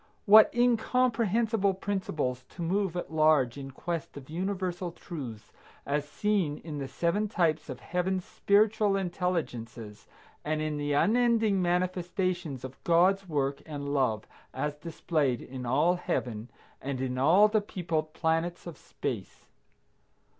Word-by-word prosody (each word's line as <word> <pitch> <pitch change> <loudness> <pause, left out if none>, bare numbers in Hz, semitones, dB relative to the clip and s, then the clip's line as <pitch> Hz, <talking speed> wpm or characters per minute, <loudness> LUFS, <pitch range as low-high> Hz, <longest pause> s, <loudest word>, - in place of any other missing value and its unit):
What 215 +1 +8
incomprehensible 230 -4 +2
principles, 160 -10 -2
to 175 - -7
move 185 +1 0
at 175 - -5
large 155 -6 +4
in 135 -1 -7
quest 160 +3 -5
of 140 +1 -11
universal 180 0 -2
truths 135 - -8 0.3
as 145 +1 -1
seen 190 -5 0
in 150 -3 -5
the 135 - -4
seven 175 +9 0
types 165 -7 0
of 130 -1 -7
Heaven's 180 +1 -1
spiritual 210 0 +2
intelligences, 150 - -3 0.4
and 155 +1 -1
in 155 -1 -2
the 145 0 -1
unending 220 +2 +3
manifestations 180 -4 -1
of 130 0 -9
God's 185 +3 +3
work 140 -2 -1
and 145 -2 -4
love 125 -7 +1 0.3
as 150 +3 -1
displayed 150 -4 -1
in 125 -1 -7
all 150 +8 +3
heaven 120 -9 -3 0.3
and 135 -1 -3
in 130 -1 -2
all 175 +10 +6
the 215 0 +1
peopled 165 -6 -3
planets 165 +2 -1
of 170 -3 -8
space! - - -6
170 Hz, 130 wpm, -29 LUFS, 140-195 Hz, 0.4 s, What